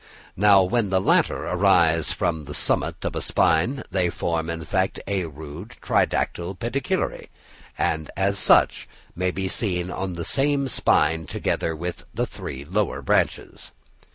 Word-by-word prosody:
Now 100 0 +6
when 105 +3 0
the 95 0 +2
latter 95 - +2
arise 85 -4 +3
from 80 -3 -2
the 75 - -7
summit - - 0
of - - -3
a - - -2
spine 115 - +1
they 90 -3 +1
form, 85 -1 -2
in 85 -1 -4
fact, 95 +2 -1
a 95 -3 -1
rude 80 - -10
tridactyle 90 +2 0
pedicellariæ, 140 - -2 0.5
and 80 -1 -1 0.2
such 100 - +3 0.3
may 90 +1 0
be 95 +1 -3
seen 90 -3 -2
on 95 0 -4
the 85 -1 -5
same 140 0 +2
spine 80 - +1
together 80 +2 -2
with 85 +2 -6
the - - 0
three 65 +1 -8
lower 95 +4 -1
branches. - - -1
90 Hz, 145 wpm, -24 LUFS, 80-100 Hz, 0.5 s, Now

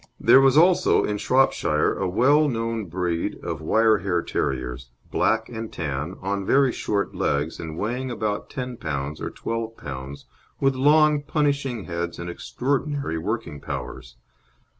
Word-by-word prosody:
There 135 - +7
was 135 +1 +4
also 180 +2 +5
in 105 0 -2
Shropshire 135 +4 +2
a 95 - -2
well 145 +10 +4
known 115 -2 -2
breed 85 -1 -2
of 80 -2 -4
wire 110 +6 +3
hair 90 -4 0
terriers, 65 -3 -3 0.2
black 110 0 +1
and 115 -1 -6
tan, 75 +2 -4
on 100 +1 -1
very 135 +5 +3
short 100 -3 -2
legs, 75 +3 -1
and 80 -1 -6
weighing 125 +6 -2
about 110 -4 -3
10 125 -3 -5
lb. 75 -3 -4
or - - -3
12 115 0 -4
lb., 70 -1 -7 0.4
with 135 0 +3
long 150 +2 +4
punishing 145 -6 -1
heads 85 -1 -4
and 85 0 -5
extraordinary 140 - -2
working 85 -5 -3
powers. 65 -3 -6
105 Hz, 145 wpm, -24 LUFS, 80-130 Hz, 0.4 s, There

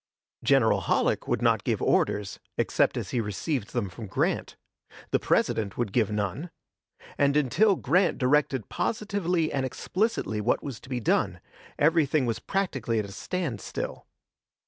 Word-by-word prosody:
General - - +4
Halleck - - +1
would - - 0
not - - +3
give - - 0
orders, 100 -2 +1 0.2
except - - +2
as - - -4
he 120 - +1
received 110 +3 -3
them 120 -5 -1
from 105 +4 -8
Grant; 95 - -1 0.6
the - - +3
President 100 -3 0
would 120 -5 -1
give 115 -5 +2
none; 105 - -2 0.7
and, 140 +1 +4
until 180 - +3
Grant 180 +1 +2
directed 135 -3 +2
positively 180 -7 -1
and 135 -2 0
explicitly 155 - -1
what 115 - +1
was 135 -6 -6
to - - -15
be 125 -2 -1
done, 110 - +1 0.4
everything 150 -3 +3
was 115 -2 -1
practically 135 - -1
at 105 - 0
a 100 - -9
standstill. 140 - -4
130 Hz, 145 wpm, -27 LUFS, 110-165 Hz, 0.7 s, General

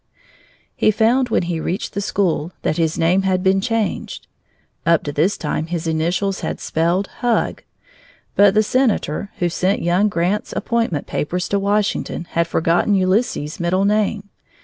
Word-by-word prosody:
He - - +3
found, 235 +4 +2
when 220 - +1
he 170 -1 -2
reached 180 +4 -3
the 200 - -2
school, 180 -4 -1
that 155 - 0
his 160 -1 0
name 175 +4 +3
had 185 -1 0
been 190 0 +3
changed. 225 -2 -2 0.6
Up 170 -1 +3
to 145 - -3
this 160 +8 +1
time 155 +1 -2
his 170 -1 -3
initials 170 +5 0
had - - -4
spelled 170 +4 0
HUG, 240 -2 0 0.7
but 200 0 +5
the 215 - +5
senator 215 - 0
who 175 - +1
sent 185 +3 0
young 180 +5 +2
Grant's 185 +3 -1
appointment 230 -11 -1
papers 180 +4 -2
to 200 - +1
Washington 200 -3 -1
had 170 0 +1
forgotten 170 +5 +2
Ulysses' 185 - 0
middle 180 +3 +1
name. 210 0 0
185 Hz, 155 wpm, -20 LUFS, 170-205 Hz, 0.7 s, but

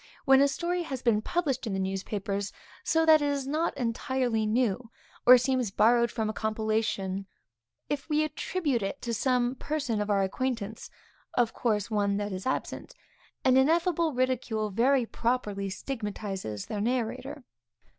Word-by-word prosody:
When 270 0 +6
a 280 - +6
story 350 +5 -1
has 270 -6 -5
been 220 -3 +3
published 285 -4 -1
in 205 - -2
the 190 - -1
newspapers, 195 +1 -3 0.3
so 325 0 +2
that 315 -1 +7
it 290 - +1
is 280 -2 -1
not 310 +5 -1
entirely 235 -1 0
new, 230 0 0 0.4
or 250 +1 +11
seems 255 -2 0
borrowed 235 +4 +4
from 220 0 -2
a 215 - -2
compilation 215 -2 -1
of 190 - -2
anas, 195 - -10 0.7
if 290 +2 -3
we 305 0 +2
attribute 305 -3 -1
it 195 +8 -3
to 235 - -2
some 250 +1 +1
person 270 -6 -2
of 210 - -3
our 200 -1 +3
acquaintance, 225 +1 -3 0.5
(of 235 -2 +2
course 215 -3 -1
one 200 -1 +1
that 205 0 -3
is 185 +5 -5
absent,) 260 - -3 0.5
an 255 0 +5
ineffable 330 +3 +3
ridicule 245 -5 -1
very 250 +5 +3
properly 215 -5 -1
stigmatizes 195 - -5
the 205 - -4
narrator. 255 +4 -2
240 Hz, 160 wpm, -28 LUFS, 210-270 Hz, 0.7 s, or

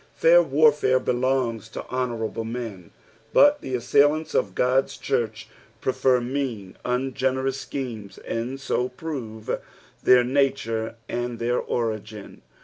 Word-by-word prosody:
Fair - - +6
warfare 450 - +4
belongs 125 -3 0
to - - -7
honourable 120 -3 -2
men, 115 -6 -6 0.4
but 290 0 +6
the 130 - -3
assailants 145 +6 +2
of 95 -2 0
God's 130 +2 +1
church 110 -1 -2 0.3
prefer 130 +1 +2
mean, 120 -6 -3
ungenerous 130 +1 -1
schemes, 115 -7 -6
and 120 +4 -4
bo 125 +1 +1
prove 125 -6 -5 0.4
their 125 -1 +6
nature 125 -4 0
and 120 0 -3
their 120 +1 0
ori^n. 110 -3 -4
125 Hz, 115 wpm, -24 LUFS, 115-135 Hz, 0.4 s, Fair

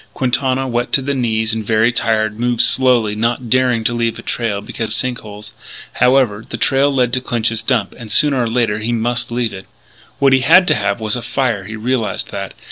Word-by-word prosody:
Quintana, 130 +1 0
wet 120 0 -2
to - - +4
the 140 +1 -2
knees 110 -4 -1
and 110 -1 -3
very 110 +2 +2
tired, 110 -2 -1
moved 120 -1 +1
slowly, 125 -5 +3
not 115 +2 -2
daring 125 -3 +2
to 120 - 0
leave 115 -1 -1
the - - -10
trail 115 -4 -2
because 110 +2 -5
of 110 - -1
sink 125 0 -2
holes. 105 0 -10 0.4
However, 125 -4 +2
the - - -5
trail 135 +1 +2
led 125 -3 0
to 130 - +1
Clinch's 115 -2 -1
Dump, 115 -7 -1
and 115 -3 -10
sooner 140 +1 +3
or 115 - -1
later 115 -3 0
he 110 +2 -3
must 120 +1 -1
leave 120 -2 -2
it. 95 -1 -10 0.5
What 135 -1 +3
he 130 - +5
had 165 +8 +5
to - - +5
have 100 -1 -1
was 110 0 -1
a 125 - -4
fire; 115 -7 -2
he 110 +3 -7
realised 115 -1 -2
that. - - -6
120 Hz, 215 wpm, -17 LUFS, 110-130 Hz, 0.5 s, he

